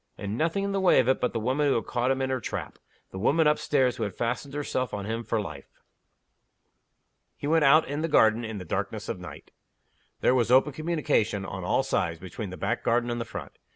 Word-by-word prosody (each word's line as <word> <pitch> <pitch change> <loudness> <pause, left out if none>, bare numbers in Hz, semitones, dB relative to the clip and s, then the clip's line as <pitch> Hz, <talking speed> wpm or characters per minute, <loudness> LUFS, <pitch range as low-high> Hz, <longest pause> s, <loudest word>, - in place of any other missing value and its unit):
And 100 +1 -4
nothing 165 +8 0
in 200 - -1
the 195 - 0
way 185 - +5
of 125 - +2
it 130 - +2
but 125 - +1
the 115 - -2
woman 130 +6 +1
who 140 - +3
had 115 - -1
caught 120 +1 -1
him 135 0 +1
in 130 - -1
her 130 - 0
trap 110 - -6 0.3
the 95 - -6
woman 155 +10 +3
up 150 0 +3
stairs 130 -4 +1
who 115 - -2
had 100 -3 -4
fastened 125 +4 -3
herself 130 -5 -2
on 100 -1 -5
him 115 +2 -3
for 115 - -1
life. 75 -9 -7 1.7
He - - -7
went 160 +1 +3
out 155 +3 +6
in 145 +3 -3
the 165 - 0
garden 110 -6 +4
in 110 -2 -5
the 90 - -7
darkness - - -3
of - - -2
the - - -8
night. - - -12 0.7
There - - +4
was 120 -3 +2
open 130 +3 +4
communication, 150 - 0
on - - -6
all - - +1
sides, 80 -1 -1
between 95 +3 -6
the 90 - -8
back 120 +5 -1
garden 120 +1 +1
and 120 0 -2
the - - -3
front. 100 -9 -8
125 Hz, 240 wpm, -27 LUFS, 110-145 Hz, 1.7 s, out